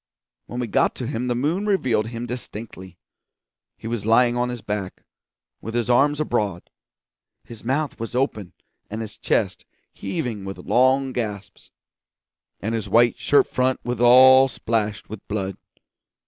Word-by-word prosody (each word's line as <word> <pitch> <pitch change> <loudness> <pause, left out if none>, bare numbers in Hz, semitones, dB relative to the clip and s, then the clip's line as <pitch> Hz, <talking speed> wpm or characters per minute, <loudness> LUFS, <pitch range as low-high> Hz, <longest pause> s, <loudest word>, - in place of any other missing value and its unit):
When 120 - -6
we 125 - -1
got 110 - +1
to 125 - -5
him 120 +2 -3
the 120 - 0
moon 160 - -1
revealed 125 - +1
him 115 +1 -5
distinctly. 110 -6 -7 0.8
He - - -14
was 115 -2 -3
lying 120 +2 +4
on 125 0 0
his 120 -2 -5
back, 100 -3 -5 0.6
with 115 +2 -6
his 120 0 0
arms 145 +4 +3
abroad; 105 - -2 0.7
his 115 -2 -12
mouth 135 +4 -1
was 115 +1 -5
open 110 -8 -1 0.4
and 110 +2 -5
his 110 -2 -7
chest - - -1 0.3
heaving 110 -1 -4
with 95 0 -6
long 130 +1 +2
gasps, 105 -5 -5 0.9
and 110 +3 -2
his 110 -2 -3
white 120 +3 +4
shirt 145 - +3
front 130 0 0
was 120 -1 -3
all 130 +2 +8
splashed 110 -4 -2
with 110 0 -8
blood. 100 -2 -3
120 Hz, 150 wpm, -23 LUFS, 105-125 Hz, 0.9 s, all